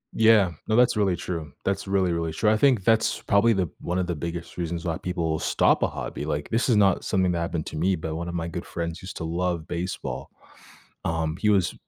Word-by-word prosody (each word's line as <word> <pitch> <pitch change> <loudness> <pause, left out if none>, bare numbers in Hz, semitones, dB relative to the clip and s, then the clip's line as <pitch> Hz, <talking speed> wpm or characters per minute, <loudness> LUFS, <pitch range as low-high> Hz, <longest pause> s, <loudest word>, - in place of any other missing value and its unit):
Yeah, 110 -5 +5 0.2
no, 110 - +2
that's 125 0 +4
really 100 -4 +2
true, 80 -5 -5
that's 95 0 -1
really, 95 -2 +2
really 85 -1 -1
true, 105 +6 +2
I 110 - +3
think 125 -6 +3
that's 110 +1 +2
probably 100 +3 +4
the 95 -4 0
one 90 +1 -2
of 90 - +1
the 85 - -2
biggest 85 +2 -6
reasons 85 0 -3
why 80 -2 -1
people 85 -3 -1
stop - - +2
a - - +3
hobby, 70 - -5
like, 75 -1 -3
this 115 +3 +1
is 120 - +5
not 100 -3 +3
something 95 -3 +1
that 85 - -1
happened 85 -1 -2
to 80 - -6
me, 95 +4 +2
but 80 -1 -4
1 85 +1 -4
of 85 - -5
my 85 0 -2
good 85 +1 -5
friends 85 0 -4
used 90 -2 -8
to - - -5
love 85 0 -2
baseball. 85 -7 -4 0.8
Um, 80 -1 -1
he 105 +2 +1
was 95 -4 +3
90 Hz, 230 wpm, -25 LUFS, 80-100 Hz, 0.8 s, Yeah